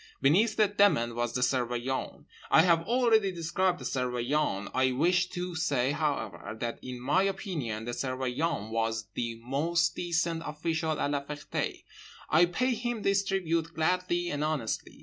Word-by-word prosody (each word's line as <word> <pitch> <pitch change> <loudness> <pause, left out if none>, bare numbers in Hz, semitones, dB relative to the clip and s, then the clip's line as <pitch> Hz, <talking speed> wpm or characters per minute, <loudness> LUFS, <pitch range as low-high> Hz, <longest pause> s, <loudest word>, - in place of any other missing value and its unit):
Beneath 205 +11 +3
the 215 -1 +4
Demon 200 - +3
was 120 0 -2
the 125 - 0
Surveillant. 125 0 -1 0.2
I 160 - +6
have 170 -1 +3
already 225 -4 +3
described 175 +1 0
the - - -8
Surveillant. 125 -4 -1
I 130 0 +2
wish 175 +6 +2
to 180 0 -4
say, 140 -5 +1
however, 110 - -3
that 120 -1 -3
in 125 -1 -7
my 145 +9 +2
opinion 170 - -2
the 120 - -3
Surveillant 130 -1 -2
was 115 -1 -1
the 115 -1 -3
most 165 +7 +1
decent 170 -1 -1
official 160 0 -2
at 145 - 0
La 140 -1 -1
Ferté. 150 +1 -4 0.5
I 170 +3 +6
pay 250 +9 0
him 240 -1 -3
this 200 0 +3
tribute 170 -4 -1
gladly 175 +1 0
and 145 +1 -2
honestly. 150 -8 -2
155 Hz, 155 wpm, -29 LUFS, 125-180 Hz, 0.5 s, I